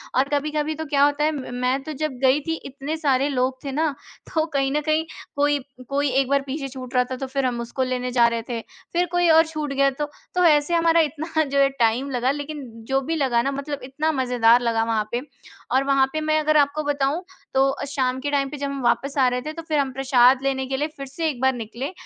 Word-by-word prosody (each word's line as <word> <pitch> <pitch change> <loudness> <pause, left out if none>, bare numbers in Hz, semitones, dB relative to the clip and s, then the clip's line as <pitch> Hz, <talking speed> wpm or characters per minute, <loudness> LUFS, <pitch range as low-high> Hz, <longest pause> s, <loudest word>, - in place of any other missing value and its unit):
और 270 +2 +2
कभी-कभी 300 +1 -1
तो 315 +1 -5
क्या 280 0 +5
होता 290 +1 +1
है 310 - +3
म 255 -2 -7
मैं 260 +2 +1
तो 310 +2 -6
जब 310 +2 -2
गई 265 +3 +5
थी 325 - 0
इतने 275 +3 -5
सारे 275 -3 +2
लोग 260 -1 0
थे 275 - -4
ना 310 +2 +1 0.4
तो 315 -1 +2
कहीं 270 -1 +1
न 300 - +1
कहीं 310 +1 +1 0.3
कोई 290 0 +2 0.3
कोई 280 0 +1
एक 265 0 +2
बार 280 0 +3
पीछे 275 +1 -3
छूट 255 -1 -9
रहा 250 - +5
था 255 - -1
तो 270 - -4
फिर 270 0 -1
हम 240 -1 -1
उसको 240 +3 -2
लेने 250 -1 -2
जा 240 -1 +4
रहे 230 -1 -1
थे। 235 -1 -2 0.3
फिर 350 +1 +2
कोई 350 -1 +3
और 320 +1 +6
छूट 305 -3 -4
गया 275 0 +3
तो, 295 +3 -3 0.3
तो 360 - +3
ऐसे 300 +1 +4
हमारा 335 0 +4
इतना 315 +1 -1
जो 280 -1 -1
है 275 - +5
टाइम 235 +4 +2
लगा 250 +1 +1
लेकिन 290 0 -5 0.2
जो 270 0 +2
भी 325 +5 -2
लगा 255 -6 +2
ना 275 - -1
मतलब 280 +1 -4
इतना 300 +5 -1
मज़ेदार 245 -4 +3
लगा 230 -2 +1
वहाँ 220 -2 0
पे। 240 +1 -1 0.5
और 265 - +4
वहाँ 275 -1 +3
पे 310 - -1
मैं 310 0 +2
अगर 310 0 +3
आपको 290 +1 +2
बताऊँ 290 +4 0 0.3
तो 270 0 +3
शाम 260 -2 -1
के 285 +2 -3
टाइम 275 -1 +1
पे 295 - -7
जब 280 - -3
हम 275 -1 -4
वापस 275 +4 +1
आ 260 -2 +5
रहे 250 0 0
थे 305 +4 -6
तो 330 - -7
फिर 305 -3 +1
हम 270 -1 0
प्रसाद 260 -1 +4
लेने 265 -1 0
के 265 0 -2
लिए 300 +2 0
फिर 275 - -5
से 320 +4 -2
एक 260 - -5
बार 265 0 +3
निकले 240 - -5
275 Hz, 250 wpm, -23 LUFS, 260-300 Hz, 0.5 s, और